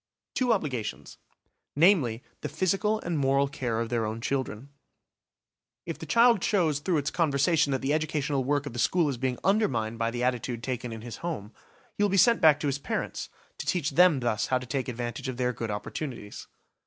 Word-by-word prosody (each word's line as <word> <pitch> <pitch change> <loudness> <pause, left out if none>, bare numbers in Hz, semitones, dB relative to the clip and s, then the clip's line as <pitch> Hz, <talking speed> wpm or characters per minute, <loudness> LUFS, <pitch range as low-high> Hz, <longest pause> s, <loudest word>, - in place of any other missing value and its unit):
Two 250 -2 +1
obligations: 135 - -3 0.6
namely, 145 - +3 0.2
the - - -4
physical 195 +4 0
and 170 -3 -2
moral 140 0 +2
care 130 -5 -2
of 115 0 -2
their 120 -1 0
own 110 +1 -3
children. 130 0 -3 1.2
If - - -5
the - - -8
child 230 -4 +5
shows 165 -8 +2
through 170 +2 0
its 145 0 -1
conversation 155 0 +2
that 135 - 0
the 140 +2 +1
educational 150 -3 0
work 145 +2 0
of 140 - -6
the 120 - -5
school 165 +6 +2
is 135 - -3
being 130 -1 -1
undermined 120 - +1
by 115 0 +1
the 120 +1 -3
attitude 125 -1 -1
taken 125 -2 -3
in 110 -1 -7
his 120 -2 -7
home, 150 -12 -5 0.4
he 205 - -1
will 205 - +3
be 195 - +1
sent 230 +5 +5
back 155 -3 +6
to 150 - 0
his 140 0 -1
parents, - - -3 0.3
to - - -5
teach 170 -6 0
them 165 -2 +5
thus 120 -3 0
how 130 - +2
to 125 - -6
take 130 +1 -2
advantage 120 0 -4
of 125 - -5
their 125 -1 0
good 115 -1 -4
opportunities. 105 +1 -6
135 Hz, 200 wpm, -28 LUFS, 120-165 Hz, 1.2 s, back